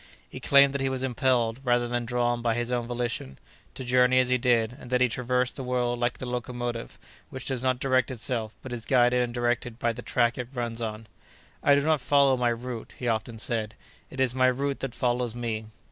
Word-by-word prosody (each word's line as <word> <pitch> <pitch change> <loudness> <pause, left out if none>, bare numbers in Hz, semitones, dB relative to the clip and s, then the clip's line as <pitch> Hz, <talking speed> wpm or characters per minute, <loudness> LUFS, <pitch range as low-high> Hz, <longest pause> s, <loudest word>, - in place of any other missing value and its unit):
He - - -9
claimed 140 0 +5
that 140 - -1
he 135 - +1
was 130 0 -2
impelled, 125 -2 +1
rather 120 -1 +2
than 120 0 -2
drawn 120 0 0
by 115 -1 +1
his 120 0 -2
own 120 -1 -1
volition, 120 - -3 0.4
to - - -5
journey 125 0 +4
as 130 -1 +4
he 125 - +3
did, 120 -2 +2
and 125 - -11
that 125 0 +2
he 125 - +4
traversed 125 +1 -1
the 135 - -5
world 125 -1 -1
like 120 0 0
the - - -6
locomotive, 120 -1 -4 0.3
which 130 -1 -7
does 130 -3 -1
not 130 -1 +1
direct 130 -2 +2
itself, 115 -3 -4
but 130 - -6
is 115 -2 -5
guided 125 0 +3
and 120 -1 -1
directed 120 -1 -1
by 120 -1 0
the 120 - -8
track 120 0 +1
it 125 - -3
runs 120 -1 -3
on. 110 -1 -4 0.6
"I 140 - +5
do 140 - +3
not 155 -1 +2
follow 140 -1 +4
my 125 -1 +1
route;" 120 -1 -6
he 125 - -4
often 115 0 -1
said, 110 -1 -2 0.3
"it 130 - -9
is 130 -2 +2
my 130 0 +3
route 140 +2 0
that 135 -3 -4
follows 120 -1 0
me." 115 -2 -3
125 Hz, 220 wpm, -27 LUFS, 120-130 Hz, 0.6 s, claimed